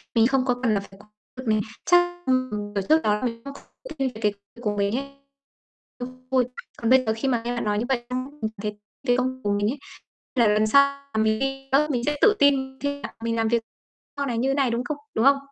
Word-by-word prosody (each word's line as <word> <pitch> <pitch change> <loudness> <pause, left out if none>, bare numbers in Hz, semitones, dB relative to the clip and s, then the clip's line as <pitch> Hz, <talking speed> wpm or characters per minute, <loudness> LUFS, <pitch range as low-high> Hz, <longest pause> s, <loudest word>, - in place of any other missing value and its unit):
mình 230 0 +5
không 265 0 +1
có 250 - +3
cần 225 -4 +3
phải 195 0 -13
lo 205 - -16 0.3
việc 255 - -7
mình, 215 -1 +3 0.2
chắc, 350 0 +3
ưm, 255 0 +2
ừm, 205 0 -4
kiểu, 200 - -1
trước 320 +1 +6
đó 210 - +3
là - - -5
mình 230 -2 -2
không 280 - -6 0.4
thích - - -8
nghi 270 -1 +1
cái 210 -1 +2 0.3
của 210 -3 -1
mình 200 +3 +1
ấy, 275 - -3 0.9
cũng 255 +1 -9
vui. 255 -2 +4 0.3
Còn 230 - -1
bây 260 0 +6
giờ 220 - +1
khi 270 - -1
mà 240 -3 +1
nghe 245 - -1
bạn 240 - -2
nói 210 -1 0
như 235 - -1
vậy 245 -3 0
xong 255 0 -2
ấy, - - -18
mình 220 0 -1
thấy 210 0 -4 0.3
cái 245 0 +4
công 255 +1 0
việc - - -18
của 205 - +1
mình 205 +1 +1
ấy, 285 - -5 0.6
là 235 -3 +5
lần 210 +1 +3
sau 280 +5 +7 0.3
là 220 0 +2
mình 220 0 +2
ghi 270 0 -3
nhớ, 295 +3 +4
mình 245 -3 -1
sẽ 295 0 0
tự 425 0 +6
tin 265 -2 +3
khi 285 0 -2
cả - - -6
mình 230 0 0
làm 225 -1 +1
việc 235 0 +1 0.5
sau 280 - -1
này 240 -4 -2
như 265 +3 +1
này, 275 -4 +2
đúng 235 +1 -1
không? 290 +4 -3 0.2
Đúng 225 - +2
không? 275 0 +7
250 Hz, 265 wpm, -25 LUFS, 220-270 Hz, 0.9 s, sau